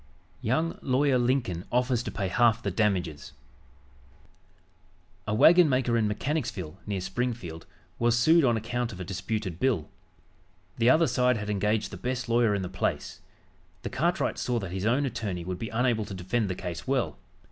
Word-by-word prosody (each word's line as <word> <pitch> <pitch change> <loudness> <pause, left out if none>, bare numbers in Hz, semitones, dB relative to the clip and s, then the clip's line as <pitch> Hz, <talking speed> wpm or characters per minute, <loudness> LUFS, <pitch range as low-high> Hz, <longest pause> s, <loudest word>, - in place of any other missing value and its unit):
YOUNG 155 +8 0
LAWYER 130 0 +2
LINCOLN 120 -9 0
OFFERS 125 -1 +1
TO - - -5
PAY 100 -3 -3
HALF 120 +2 +3
THE 100 - -1
DAMAGES 90 -7 -1 1.9
A 105 - 0
wagonmaker 135 -4 +5
in 110 -2 +2
Mechanicsville, 105 - -3
near 100 -2 -2
Springfield, 95 -4 -4 0.3
was 120 0 +3
sued 160 +7 +5
on 120 -3 +3
account 115 +2 -2
of 95 - -9
a - - -4
disputed 95 -1 -4
bill. 120 - 0 0.9
The 115 +1 +4
other 160 +5 +5
side 125 -4 +2
had 105 0 -3
engaged 105 +2 0
the 95 - -7
best 125 +4 -3
lawyer 115 -2 +3
in 100 - -2
the - - -3
place. 95 +1 -3 0.6
The - - -4
cartwright 170 +8 0
saw 125 -1 -1
that 95 -6 -4
his 95 +3 -2
own 130 +5 +2
attorney 100 -8 -4
would 90 0 -4
be 115 - -4
unable 115 -2 +1
to 100 - -7
defend 95 +4 -1
the 95 - -2
case 85 -3 -6
well. 125 - 0
115 Hz, 170 wpm, -27 LUFS, 95-125 Hz, 1.9 s, wagonmaker